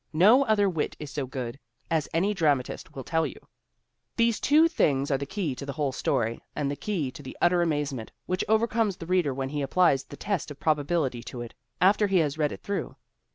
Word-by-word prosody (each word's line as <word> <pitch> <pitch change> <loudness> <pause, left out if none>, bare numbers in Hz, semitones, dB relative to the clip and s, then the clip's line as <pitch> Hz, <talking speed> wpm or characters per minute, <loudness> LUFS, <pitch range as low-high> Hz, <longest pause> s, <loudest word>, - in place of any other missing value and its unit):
No 210 - +6
other 210 -2 +3
wit 165 -5 -1
is 150 -2 -7
so 140 -2 -3
good, 125 0 -5 0.3
as 160 -3 +1
any 190 +6 +1
dramatist 145 -9 0
will 135 - -5
tell 160 +3 +1
you. - - -9 0.8
These 230 -1 +2
two 310 +4 +5
things 140 - +1
are 135 - +3
the 140 - -4
key 180 -5 -2
to 130 - -8
the 140 0 -5
whole 145 -2 -1
story 115 -3 -1
and 140 -2 -1
the - - -2
key 160 -7 -2
to 145 - -11
the 130 - -9
utter 175 0 +3
amazement 145 -8 -1
which 185 0 -1
overcomes 220 -2 +2
the 165 - -7
reader 180 -4 +2
when 135 0 -3
he 145 +1 -2
applies 140 -2 +3
the 145 - -11
test 200 -8 -2
of 145 - -9
probability 150 -4 0
to 120 - -6
it 120 - -8 0.3
after 205 +3 +4
he 195 -1 +2
has 150 -4 +1
read 150 -1 +2
it - - -8
through. 200 - -3
155 Hz, 215 wpm, -27 LUFS, 140-195 Hz, 0.8 s, No